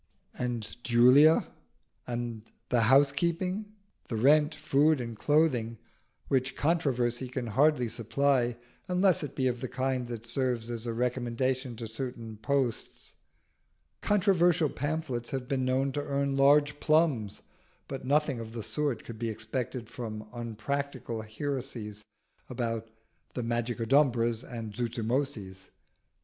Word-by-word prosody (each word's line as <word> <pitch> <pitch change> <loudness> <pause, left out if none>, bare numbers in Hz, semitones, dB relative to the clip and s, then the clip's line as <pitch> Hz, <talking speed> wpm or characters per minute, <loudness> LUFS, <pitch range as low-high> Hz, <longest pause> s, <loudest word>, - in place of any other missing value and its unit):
And 120 -1 -4
Julia? 125 +6 +6 0.6
And 120 -2 -3 0.3
the 120 -2 +3
housekeeping? 170 +9 +2 0.4
the 115 - -3
rent, 150 +6 +4
food, 150 +2 +3
and 115 -2 -5
clothing, 125 -5 +2 0.5
which 135 -1 0
controversy 130 -6 0
can 125 0 -4
hardly 130 +2 +3
supply 120 +2 +1 0.3
unless 180 0 +3
it 145 - -6
be 130 - 0
of 125 -1 0
the 130 - -2
kind 130 -1 -1
that 115 -2 -6
serves 120 -1 -1
as 120 0 -4
a 115 - -1
recommendation 125 +1 -1
to 115 0 -6
certain 115 -1 -6
posts. 125 +1 -2 0.9
Controversial 180 -6 +3
pamphlets 145 -5 -3
have 130 -3 -4
been 130 -1 0
known 130 +2 +1
to 145 - -2
earn 140 -1 -1
large 145 +2 +4
plums; 150 -10 +1 0.4
but 135 -1 -6
nothing 145 -1 +1
of 115 -1 -7
the 115 -2 -5
sort 145 -4 -1
could 115 -2 -9
be 115 -1 -1
expected 115 +2 -4
from 110 -3 -6
unpractical 120 +1 -4
heresies 110 -3 -5 0.5
about 115 -2 -3 0.5
the 125 - -2
Magicodumbras 120 0 +1
and 115 -4 -6
Zuzumotzis. 115 -4 -3
125 Hz, 125 wpm, -29 LUFS, 115-140 Hz, 0.9 s, Julia